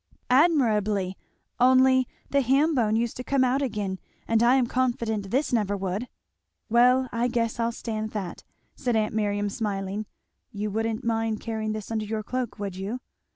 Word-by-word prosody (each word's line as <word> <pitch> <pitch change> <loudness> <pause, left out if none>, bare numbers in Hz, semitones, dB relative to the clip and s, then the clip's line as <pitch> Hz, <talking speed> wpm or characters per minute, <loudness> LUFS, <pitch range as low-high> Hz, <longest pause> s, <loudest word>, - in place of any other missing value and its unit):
"Admirably! 215 - +3 0.4
only 260 0 +5 0.2
the 280 - +4
ham 275 +6 +3
bone 220 -5 +2
used 230 0 0
to 250 - -5
come 275 0 +2
out 260 +2 +2
again, 205 -7 -2 0.3
and 225 -1 +3
I 240 +2 +5
am 260 -2 +3
confident 230 -5 -1
this 265 +5 0
never 205 -3 +1
would." 195 +5 -3 0.6
"Well 250 +2 +5
I 235 +1 +1
guess 235 -2 -1
I'll 230 0 +1
stand 220 -2 -4
that," 200 -5 -5 0.3
said 245 -3 -1
aunt 215 -1 +1
Miriam 205 -1 0
smiling, 200 -1 -3 0.4
"you 210 0 -3
wouldn't 225 +3 -2
mind 225 -1 0
carrying 220 -1 -3
this 215 0 -6
under 220 -1 -1
your 215 0 -3
cloak, 245 -3 -3
would 200 -3 -4
you?" 205 +6 -4
225 Hz, 165 wpm, -26 LUFS, 210-250 Hz, 0.6 s, only